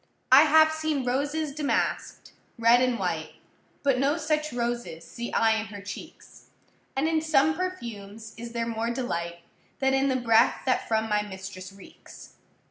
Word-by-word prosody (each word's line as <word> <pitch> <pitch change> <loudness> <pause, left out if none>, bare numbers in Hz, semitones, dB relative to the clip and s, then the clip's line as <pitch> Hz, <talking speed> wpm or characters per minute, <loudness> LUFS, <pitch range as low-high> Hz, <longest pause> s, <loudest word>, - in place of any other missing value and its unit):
I 275 +4 +9
have 315 +1 +6
seen 315 -4 -2
roses 285 +4 -1
damask’d, 295 -1 -2 0.3
red 230 +1 +5
and 250 -2 +1
white, - - -3 0.5
But 275 -3 +2
no 280 +4 +2
such 305 -1 -1
roses 235 -8 -3
see 235 0 -7
I 225 -1 +3
in 220 0 -4
her 205 -1 -9
cheeks; 200 0 -11 0.5
And 275 +4 +1
in 320 -1 +1
some 315 -1 +3
perfumes 225 - -6
is 235 0 -8
there 235 -1 -1
more 230 0 -2
delight 170 -9 -3 0.4
Than 265 0 +1
in 270 +1 +2
the 260 - +1
breath 230 -3 +3
that 255 - 0
from 220 0 0
my 210 -1 +1
mistress 190 -1 -8
reeks. 195 0 -15
245 Hz, 160 wpm, -26 LUFS, 220-290 Hz, 0.5 s, I